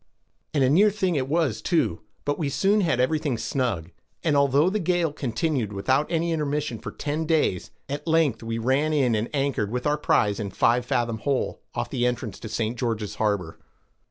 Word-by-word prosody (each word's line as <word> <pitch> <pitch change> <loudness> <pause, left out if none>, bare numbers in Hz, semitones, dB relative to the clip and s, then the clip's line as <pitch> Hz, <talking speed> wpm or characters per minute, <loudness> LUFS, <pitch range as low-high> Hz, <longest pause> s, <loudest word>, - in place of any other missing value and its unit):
And 140 - +3
a 130 - +4
near 200 +8 +6
thing 190 -3 0
it 135 -4 0
was 140 -8 0
too, 125 - +1 0.2
but 145 0 -1
we 150 -4 0
soon 200 +8 +2
had 160 -9 +1
everything 145 0 +1
snug; 115 - -2 0.3
and 155 -3 +2
although 140 +2 +4
the 205 +3 +1
gale 175 -3 +1
continued 130 -3 -1
without 130 - 0
any 170 0 +1
intermission 150 -6 -1
for - - -6
ten 155 +2 -3
days, 155 - +1 0.2
at 145 +4 -5
length 160 -8 +2
we 115 0 -3
ran 135 +7 +1
in 135 -5 +2
and 110 +2 -1
anchored 135 -7 0
with 125 +2 -3
our 150 0 +1
prize 105 -8 +2
in 105 -2 -3
Five 120 +5 +2
Fathom 115 -2 0
Hole, 140 +1 -1
off 120 0 -3
the 125 -2 +1
entrance 125 -1 -3
to 110 - -7
St. 115 +2 -1
George's 110 -4 -2
Harbor. 100 -6 -1
135 Hz, 190 wpm, -25 LUFS, 115-155 Hz, 0.3 s, near